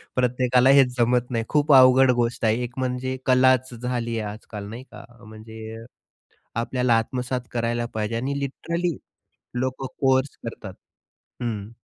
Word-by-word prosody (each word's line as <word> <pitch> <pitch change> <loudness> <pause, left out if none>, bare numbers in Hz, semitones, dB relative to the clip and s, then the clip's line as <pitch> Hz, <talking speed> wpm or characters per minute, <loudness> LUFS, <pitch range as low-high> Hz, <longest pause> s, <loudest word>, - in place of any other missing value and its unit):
प्रत्येकाला 125 0 +3
हेच 125 -2 +4
जमत 120 +1 +2
नाही, 115 -2 0
खूप 150 -1 +3
अवघड 130 0 +7
गोष्ट 120 -1 -1
आहे. 110 +3 +2
एक 120 0 -6
म्हणजे 130 0 -2
कलाच 130 0 +3
झाली 120 -1 -3
आहे 105 -1 -4
आज-काल 105 -1 -9
नाही 120 +4 -8
का? - - -11 0.2
म्हणजे, 110 +1 -10 0.7
आपल्याला 120 0 +1
आत्मसात 125 +2 -2
करायला 120 0 -1
पाहिजे 110 +1 -2
आणि 135 +4 -2
लिटरली 170 +4 -3 0.6
लोकं 130 +1 -3 0.2
कोर्स 130 +1 +2
करतात, 105 -4 -7 0.7
हं. 110 -2 -4
125 Hz, 135 wpm, -24 LUFS, 115-130 Hz, 0.7 s, अवघड